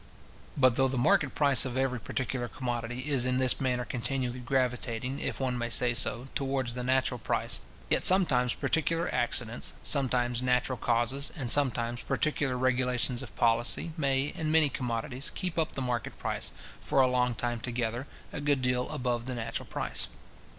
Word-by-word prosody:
But 130 Hz, -3 st, +3 dB
though 135 Hz, 0 st, +3 dB
the 130 Hz, 0 st, -3 dB
market 155 Hz, +1 st, +2 dB
price 140 Hz, -3 st, +5 dB
of 130 Hz, -1 st, -4 dB
every 130 Hz, -2 st, -1 dB
particular 125 Hz, +1 st, -4 dB
commodity 120 Hz, -1 st, -5 dB
is 130 Hz, -4 st, +4 dB
in 125 Hz, 0 st, 0 dB
this 130 Hz, 0 st, +2 dB
manner 125 Hz, -2 st, -1 dB
continually 125 Hz, 0 st, -3 dB
gravitating, 125 Hz, 0 st, -2 dB
if -, -, -4 dB
one 125 Hz, -2 st, -2 dB
may 120 Hz, 0 st, -3 dB
say 120 Hz, +1 st, +5 dB
so, 120 Hz, +1 st, +1 dB
towards 135 Hz, -3 st, -2 dB
the 125 Hz, -, -5 dB
natural 130 Hz, 0 st, 0 dB
price; -, -, -1 dB, 0.3 s
yet -, -, +1 dB
sometimes 135 Hz, -10 st, +6 dB
particular 165 Hz, +4 st, -1 dB
accidents, 120 Hz, -1 st, -1 dB
sometimes 125 Hz, -3 st, +2 dB
natural 125 Hz, 0 st, 0 dB
causes, 120 Hz, +4 st, +1 dB
and 125 Hz, -5 st, -1 dB
sometimes 120 Hz, -4 st, +2 dB
particular 140 Hz, -4 st, -1 dB
regulations 125 Hz, -1 st, +1 dB
of -, -, -10 dB
policy, 120 Hz, +7 st, +2 dB
may, 140 Hz, -3 st, 0 dB
in 155 Hz, -1 st, -3 dB
many 155 Hz, -2 st, +5 dB
commodities, 125 Hz, +1 st, -3 dB
keep 180 Hz, -3 st, -3 dB
up 160 Hz, -, -1 dB
the 135 Hz, -, -1 dB
market 120 Hz, -3 st, -4 dB
price, -, -, -3 dB, 0.3 s
for -, -, -1 dB
a -, -, +5 dB
long 125 Hz, -1 st, 0 dB
time 120 Hz, +1 st, -2 dB
together, 120 Hz, +1 st, -4 dB, 0.3 s
a 150 Hz, -, -5 dB
good 145 Hz, -2 st, 0 dB
deal 125 Hz, 0 st, 0 dB
above 125 Hz, -5 st, -2 dB
the 130 Hz, 0 st, -3 dB
natural 115 Hz, -1 st, -4 dB
price. -, -, 0 dB
125 Hz, 170 wpm, -28 LUFS, 120-135 Hz, 0.3 s, sometimes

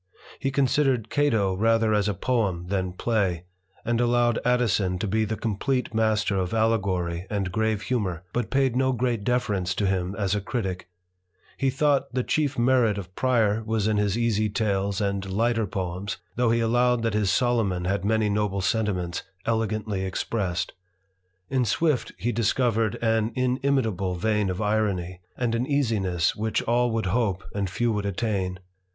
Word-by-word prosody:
He 135 Hz, -, 0 dB
considered 135 Hz, -3 st, +1 dB
Cato 115 Hz, -10 st, +2 dB
rather 115 Hz, +2 st, +2 dB
as 105 Hz, -1 st, +2 dB
a 100 Hz, -, -1 dB
poem 100 Hz, -5 st, 0 dB
than 95 Hz, -2 st, -1 dB
play, 95 Hz, -5 st, 0 dB, 0.4 s
and 120 Hz, +1 st, +1 dB
allowed 120 Hz, -1 st, +2 dB
Addison 110 Hz, -7 st, +1 dB
to 90 Hz, -, -2 dB
be 110 Hz, +2 st, +1 dB
the 110 Hz, +1 st, -2 dB
complete 115 Hz, +4 st, -1 dB
master 110 Hz, -2 st, +1 dB
of 95 Hz, +3 st, -1 dB
allegory 95 Hz, -6 st, 0 dB
and 100 Hz, -3 st, -2 dB
grave 110 Hz, +1 st, 0 dB
humour, 95 Hz, -9 st, -2 dB
but 120 Hz, -4 st, -1 dB
paid 135 Hz, -3 st, +2 dB
no 130 Hz, 0 st, +2 dB
great 120 Hz, -3 st, -1 dB
deference 100 Hz, -6 st, 0 dB
to 105 Hz, -, 0 dB
him 95 Hz, 0 st, -1 dB
as 100 Hz, -2 st, 0 dB
a 105 Hz, -, 0 dB
critick. 95 Hz, -5 st, -4 dB, 0.7 s
He 135 Hz, -, +1 dB
thought 140 Hz, +1 st, +1 dB
the 125 Hz, -, +1 dB
chief 145 Hz, -1 st, 0 dB
merit 120 Hz, -3 st, +3 dB
of 95 Hz, -2 st, -7 dB
Prior 110 Hz, -3 st, +1 dB
was 110 Hz, -1 st, 0 dB
in 110 Hz, -1 st, +1 dB
his 105 Hz, 0 st, +1 dB
easy 110 Hz, -2 st, +1 dB
tales 100 Hz, -1 st, 0 dB
and 100 Hz, -1 st, -1 dB
lighter 115 Hz, +1 st, +1 dB
poems, 95 Hz, +1 st, -4 dB, 0.2 s
though 120 Hz, -1 st, +2 dB
he 115 Hz, 0 st, +2 dB
allowed 120 Hz, +1 st, +2 dB
that 115 Hz, -2 st, 0 dB
his 105 Hz, -2 st, +1 dB
Solomon 105 Hz, -6 st, +1 dB
had 95 Hz, 0 st, 0 dB
many 110 Hz, +1 st, +2 dB
noble 100 Hz, -1 st, 0 dB
sentiments 95 Hz, -4 st, -1 dB, 0.2 s
elegantly 110 Hz, -3 st, -1 dB
expressed. 95 Hz, -1 st, -2 dB, 0.7 s
In 130 Hz, -1 st, +1 dB
Swift 145 Hz, +4 st, +1 dB
he 120 Hz, -, -1 dB
discovered 115 Hz, -1 st, +1 dB
an 110 Hz, 0 st, +2 dB
inimitable 125 Hz, -7 st, 0 dB
vein 105 Hz, +2 st, 0 dB
of 95 Hz, +3 st, -2 dB
irony, 100 Hz, -4 st, -1 dB, 0.2 s
and 120 Hz, -2 st, 0 dB
an 120 Hz, +2 st, 0 dB
easiness 105 Hz, -, +1 dB
which 110 Hz, +1 st, -1 dB
all 120 Hz, +1 st, +2 dB
would 115 Hz, -2 st, -1 dB
hope 100 Hz, -1 st, 0 dB
and 100 Hz, -2 st, -1 dB
few 115 Hz, +6 st, 0 dB
would 105 Hz, -2 st, -1 dB
attain. 95 Hz, -2 st, -1 dB
110 Hz, 165 wpm, -25 LUFS, 95-120 Hz, 0.7 s, merit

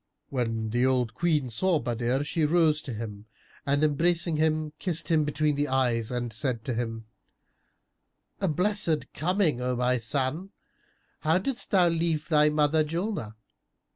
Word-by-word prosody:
When 115 Hz, -4 st, -2 dB
the 120 Hz, +2 st, +1 dB
old 125 Hz, -3 st, +1 dB
Queen 155 Hz, -6 st, +1 dB
saw 175 Hz, +9 st, +1 dB
Badr, 120 Hz, +1 st, -1 dB
she 155 Hz, +2 st, -1 dB
rose 155 Hz, -1 st, +3 dB
to 130 Hz, -, -6 dB
him 105 Hz, -1 st, -7 dB, 0.4 s
and 145 Hz, +2 st, +2 dB
embracing 165 Hz, +3 st, +1 dB
him, 155 Hz, 0 st, 0 dB
kissed 175 Hz, -2 st, -1 dB
him 155 Hz, -2 st, +3 dB
between 150 Hz, +1 st, 0 dB
the 145 Hz, +1 st, -1 dB
eyes 125 Hz, -4 st, +1 dB
and 120 Hz, -2 st, -3 dB
said 115 Hz, +1 st, -2 dB
to 130 Hz, -, -1 dB
him, 115 Hz, -1 st, -4 dB, 1.3 s
"A 195 Hz, -, 0 dB
blessed 170 Hz, -5 st, 0 dB
coming, 165 Hz, -4 st, +1 dB
O 125 Hz, 0 st, -1 dB
my 125 Hz, +1 st, +1 dB
son! 140 Hz, -, -2 dB, 0.7 s
How 160 Hz, +2 st, +2 dB
didst 245 Hz, +6 st, -3 dB
thou 185 Hz, -3 st, +4 dB
leave 165 Hz, -2 st, 0 dB
thy 150 Hz, -1 st, +5 dB
mother 150 Hz, +1 st, +2 dB
Julnar?" 165 Hz, -, -3 dB
150 Hz, 150 wpm, -27 LUFS, 125-165 Hz, 1.3 s, thy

